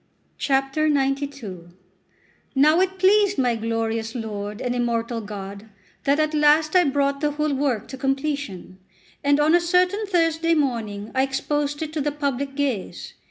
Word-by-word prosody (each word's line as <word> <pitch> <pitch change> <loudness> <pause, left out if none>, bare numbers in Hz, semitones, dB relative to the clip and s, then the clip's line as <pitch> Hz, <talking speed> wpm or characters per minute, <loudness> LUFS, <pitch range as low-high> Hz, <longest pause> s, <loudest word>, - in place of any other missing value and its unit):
XCII 270 +3 +1 1.7
NOW 305 +5 +5
it 380 0 0
pleased 400 +2 +4
my 245 -3 +2
glorious 225 0 -2
Lord 210 -2 -5
and 245 -1 -2
immortal 235 -1 -1
God 200 0 -8 0.4
that 280 +2 +3
at 310 0 +1
last 305 +2 +3
I 360 - +6
brought 280 0 0
the 295 -1 0
whole 300 0 0
work 265 -5 -1
to 265 - -7
completion: 270 -9 -3 0.4
and 285 +1 +3
on 300 +2 +4
a 350 - +5
certain 365 +4 +1
Thursday 330 -2 +2
morning 225 -7 -2
I 260 - +2
exposed 290 +2 -1
it 310 0 -6
to 310 - -1
the 295 +1 0
public 280 -1 -3
gaze. 275 -9 -3
280 Hz, 150 wpm, -23 LUFS, 235-310 Hz, 1.7 s, I